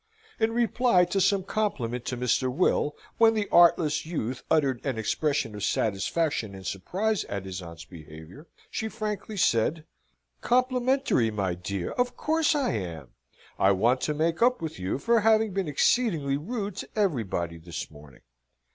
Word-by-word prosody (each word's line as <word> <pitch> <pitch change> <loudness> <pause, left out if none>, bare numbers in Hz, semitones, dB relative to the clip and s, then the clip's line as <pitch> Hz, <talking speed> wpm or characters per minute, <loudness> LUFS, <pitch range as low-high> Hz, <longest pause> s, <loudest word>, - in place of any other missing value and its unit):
In 220 0 +2
reply 235 -5 +3
to 190 +3 -1
some 195 0 +2
compliment 125 - -2
to 125 - -3
Mr. 125 +1 +1
Will, 150 0 +1 0.2
when 225 -1 +6
that 210 -2 -1
artless 165 -3 +5
youth 130 -7 -4
uttered 140 -6 +1
an 135 -4 -2
expression 140 +2 -1
of 105 -1 -6
satisfaction 110 +2 -1
and 95 -1 -11
surprise 190 - -1
at 100 -1 -5
his 95 0 -6
aunt's 85 -1 -10
behaviour, 80 - -12 0.2
she 220 - -3
frankly 215 -1 -5
said: 155 - +1 0.6
"Complimentary, 255 - +2
my 100 -4 -1
dear! 90 +1 -4
Of 245 0 -1
course 320 0 +1
I 285 -2 +1
am. 85 - -5 0.5
I 100 +1 +5
want 120 +7 +2
to 150 - -1
make 165 +4 0
up 250 +1 +4
with 160 - -6
you 95 +5 -2
for 230 +10 +2
having 220 -1 +3
been 195 -3 -1
exceedingly 150 - +1
rude 200 - -4
to - - -6
everybody 110 - -1
this 85 -1 -7
morning. 75 -2 -15
150 Hz, 155 wpm, -27 LUFS, -, 0.6 s, when